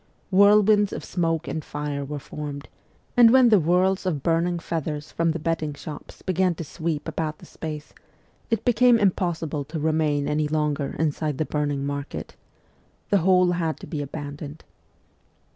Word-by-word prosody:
Whirlwinds 205 +1 +5
of - - -6
smoke 165 -2 -1
and 160 - -3
fire 145 -1 -4
were 145 +2 -5
formed; 145 0 -7 0.5
and 240 -2 +8
when 255 0 +6
the 210 -3 +6
whirls 180 +3 +2
of 150 -7 -1
burning 170 +1 +1
feathers 155 -3 -4
from 165 0 +1
the 160 - 0
bedding 155 -2 -2
shops 150 +1 -10
began 185 -1 +1
to 165 - -5
sweep 160 0 -4
about 155 -1 -3
the - - -14
space, 155 -1 -7 0.6
it 225 -3 -1
became 245 0 +5
impossible 175 -7 0
to 155 +3 -5
remain 150 -2 +1
any 150 0 +1
longer 150 -2 -1
inside 155 -2 -1
the 155 - 0
burning 145 -2 -1
market. 140 0 -5 0.8
The 200 - +5
whole 180 0 +4
had 165 -3 -1
to - - -7
be 150 -4 -4
abandoned. 145 +1 -7
160 Hz, 160 wpm, -24 LUFS, 150-180 Hz, 0.8 s, and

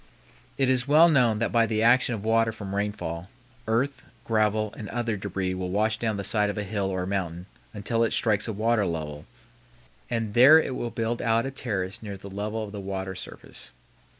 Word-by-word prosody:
It 135 - +2
is 130 0 +1
well 155 +4 +7
known 125 -8 +3
that 115 - -1
by 115 -1 +3
the 110 0 0
action 120 +1 +4
of 105 -1 -7
water 115 0 +3
from 100 -3 -7
rainfall, 95 -4 -3 0.4
earth, 130 +5 -1 0.2
gravel, 110 -1 +1
and 105 -3 -7
other 120 -2 -2
débris 95 -1 -3
will 90 0 -4
wash 110 +3 +1
down 110 -3 -1
the 100 - -3
side 105 +1 +2
of 100 - -4
a 105 - -1
hill 100 -1 -2
or 95 -1 -2
mountain 90 -3 -3 0.3
until 115 +3 -1
it 115 - +1
strikes 105 -2 +1
a - - -2
water 110 0 +1
level, 75 -3 -5 0.8
and 115 -3 -2
there 130 +7 +8
it 130 - -2
will 120 - -3
build 115 +1 -2
out 115 0 +2
a 135 - -3
terrace 100 -6 -3
near 100 -3 -6
the 100 0 -11
level 105 +3 -3
of 105 - -7
the 100 -1 -6
water 95 -1 -4
surface. 90 -8 -9
110 Hz, 205 wpm, -26 LUFS, 100-115 Hz, 0.8 s, there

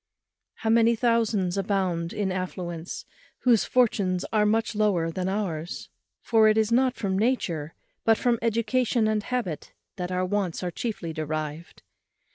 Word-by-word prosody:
How 220 - -1
many 230 0 +5
thousands 220 -5 +1
abound 185 -4 -1
in 200 -2 -1
affluence 180 -2 -5 0.4
whose 240 -4 +4
fortunes 200 -7 +1
are 210 -1 +4
much 225 +2 +1
lower 200 -6 +1
than 185 +2 -2
ours! 175 -5 -3 0.3
for 220 -2 +4
it 215 0 +4
is 220 0 +2
not 255 +1 +3
from 190 -2 -1
nature, 170 - -1 0.3
but 225 0 +4
from 240 -2 +1
education 230 0 +1
and 215 -1 +1
habit, 205 - -4 0.2
that 180 -1 -3
our 185 0 0
wants 185 -2 -1
are 180 - -2
chiefly 175 -5 -4
derived. 155 +1 -5
205 Hz, 145 wpm, -26 LUFS, 180-225 Hz, 0.4 s, many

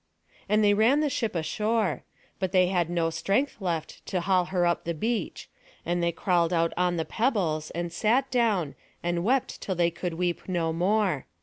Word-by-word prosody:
And 215 +1 +3
they 205 0 +5
ran 230 +8 +4
the 300 -2 0
ship 225 -6 -2
ashore; 210 +2 0 0.4
but 190 -2 -1
they 185 -1 +4
had 175 -3 +1
no 170 -1 0
strength 200 - 0
left 170 -4 -3
to 180 - -1
haul 185 0 +2
her 180 -1 0
up 170 0 +1
the 170 0 -3
beach; 225 +7 -2 0.4
and 175 0 0
they 170 0 +1
crawled 170 0 +1
out 165 -1 +1
on 180 -1 +1
the 160 - -1
pebbles, 185 - 0
and 170 0 -4
sat 240 +8 +1
down, 215 - +1 0.3
and 175 0 -1
wept 255 +5 0
till 190 - -2
they 170 -1 +2
could 170 0 -4
weep 175 +1 -2
no 165 -3 0
more. 185 -3 +1
180 Hz, 190 wpm, -27 LUFS, 170-215 Hz, 0.4 s, they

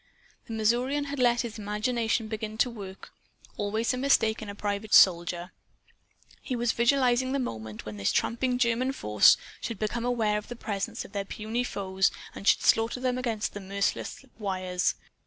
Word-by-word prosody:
The 225 - -6
Missourian 240 +6 +1
had 285 -1 -5
let 240 -1 +4
his 230 -2 -6
imagination 220 +2 -1
begin 215 0 -5
to 245 +2 +2
work; 195 -4 -10 0.4
always 215 +4 -1
a - - -2
mistake 225 -5 +2
in 215 - -6
a 200 - -6
private 205 +1 0
soldier. 175 0 +4 0.9
He 255 - -3
was 240 -1 +1
visualizing 255 +1 +2
the - - +1
moment 110 - -5
when 105 -1 -7
this 100 - +1
tramping 245 +2 0
German 250 +2 +1
force 105 - +5 0.2
should 230 - -4
become 220 +3 -2
aware 225 -4 +1
of 210 - -13
the 245 - -7
presence 205 -4 -4
of - - -13
their 200 -1 -2
puny 220 +4 -3
foes 190 -4 0 0.2
and 200 - -7
should - - +5
slaughter 225 +2 +3
them 255 0 0
against 225 -4 -2
the 205 - -6
merciless 200 +7 -2
wires. 185 -3 -1
220 Hz, 175 wpm, -28 LUFS, 200-245 Hz, 0.9 s, force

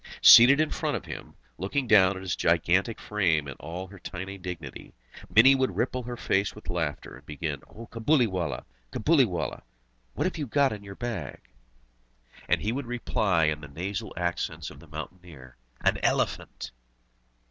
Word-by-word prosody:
Seated 125 +5 +10
in 155 - +1
front - - -1
of - - -10
him, - - -9 0.2
looking 115 +9 -1
down 100 -4 +5
on 95 - -8
his 90 -2 -2
gigantic 90 +6 +1
frame 85 -8 0
in 70 - -5
all 85 +4 -6
her 95 +1 -13
tiny 95 +4 -6
dignity, 90 -7 -8 0.3
Mini 110 +9 +7
would 130 -1 0
ripple 130 +1 -1
her 120 0 -6
face 100 -2 0
with 105 - -7
laughter, 80 -4 -3
and - - -18
begin: 75 -2 -4
"O 115 +2 -10
Cabuliwallah, 110 - 0 0.3
Cabuliwallah, 115 - +1 0.5
what - - -1
have 185 -3 -2
you 145 - -3
got 140 +1 +2
in 105 -1 -8
your 100 0 -9
bag?" 105 - -5 1.1
And - - +2
he 105 - 0
would 130 +1 -4
reply, 110 -7 0
in 75 -1 0
the 75 - -9
nasal 95 +9 -5
accents 85 0 -3
of 70 - -13
the 85 - -15
mountaineer: 75 -4 -10 0.3
"An - - +2
elephant!" 60 - -1
95 Hz, 165 wpm, -27 LUFS, 85-115 Hz, 1.1 s, Seated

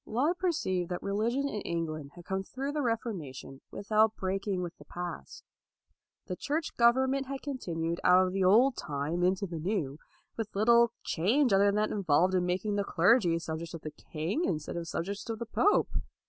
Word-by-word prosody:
Laud 290 +11 0
perceived 190 - 0
that 180 - -4
religion 230 +8 0
in 210 -7 -4
England 155 -4 -3
had 175 -1 -12
come 190 0 -2
through 265 +8 -4
the 300 - -2
Refor 230 -3 -1
mation 135 -4 -9
without 215 +2 +2
breaking 190 0 -2
with 175 -1 -6
the - - -14
past. 175 - -7 0.8
The 180 - -4
Church 300 - -3
government 260 +3 +3
had 275 0 -5
continued 170 - -3
out 185 +1 +6
of 185 - -3
the 195 0 +1
old 235 +8 +5
time 150 +4 -3
into 185 +2 +2
the 170 -3 -5
new, 160 -5 -2 0.4
with 220 -3 -5
little 235 +3 +5
change 230 - +2
other 195 +1 +5
than 200 - +2
that 215 0 +1
involved 185 -2 +2
in 180 -1 +1
making 190 +3 -1
the 200 - +1
clergy 180 -1 +3
subjects 165 0 -5
of 165 - -8
the 155 - -6
king 165 - -3
instead 155 - -2
of 170 -1 -4
subjects 200 +7 -4
of 225 - -2
the 235 - -5
pope. 405 - +2
195 Hz, 190 wpm, -30 LUFS, 170-235 Hz, 0.8 s, out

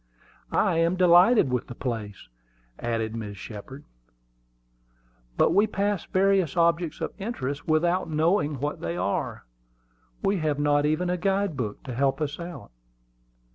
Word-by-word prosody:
"I - - +2
am 165 +2 +2
delighted 180 - +5
with 125 - -1
the 120 - -8
place," 110 - -5 0.5
added 115 -2 -2
Mrs. 105 -3 -5
Shepard. 110 +8 -9 1.5
"But - - +4
we 205 +4 +4
pass 205 -3 -1
various 190 -3 +2
objects 170 -1 +1
of - - -3
interest 145 - -4
without 170 +3 +1
knowing 155 -2 +1
what 145 +2 -3
they 85 +1 -3
are. 95 +3 -2 0.8
We 200 0 +2
have 155 -4 0
not 145 0 +2
even 175 +4 0
a 180 - 0
guide 195 -1 0
book 110 -6 -4
to 130 - -6
help 135 +4 +1
us 150 0 -3
out." 170 - -8
155 Hz, 140 wpm, -26 LUFS, 130-180 Hz, 1.5 s, delighted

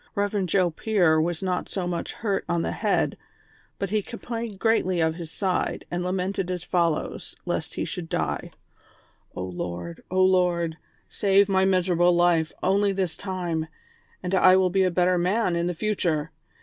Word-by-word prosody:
Eev. 205 -1 0
Joe 180 0 +2
Pier 175 -4 +2
was 170 +2 -2
not 180 -1 -1
so 190 -3 -2
much 175 -1 -3
hurt 205 -3 -1
on 170 -1 +1
the - - -1
head, - - 0 0.6
but 195 -1 -3
he 215 0 +2
complained 230 -1 -6
greatly 190 -4 +2
of 160 -1 +2
his 165 -1 -7
side, 185 +2 -1
and 175 0 -1
lamented 185 0 -2
as 180 -2 -3
follows, 170 -4 -1
lest 170 -2 -3
he - - -2
should 175 -3 -5
die: 75 -3 -2 0.4
" - - -35
O - - -3
Lord! 85 -2 -5
O 185 +1 +3
Lord! 175 -3 +2 0.3
save 200 0 +3
my 190 -1 +3
miserable 180 -2 +3
life 170 -2 +3
only 200 +1 +3
this 190 -4 -1
time, 175 -5 -3 0.6
and 180 +1 -3
I 185 -1 +6
will 185 -1 +3
be 195 +1 +2
a 185 - +4
better 180 0 +2
man 185 +1 +1
in 170 0 0
the 175 - -2
future 165 -6 -1
180 Hz, 175 wpm, -25 LUFS, 170-195 Hz, 0.6 s, I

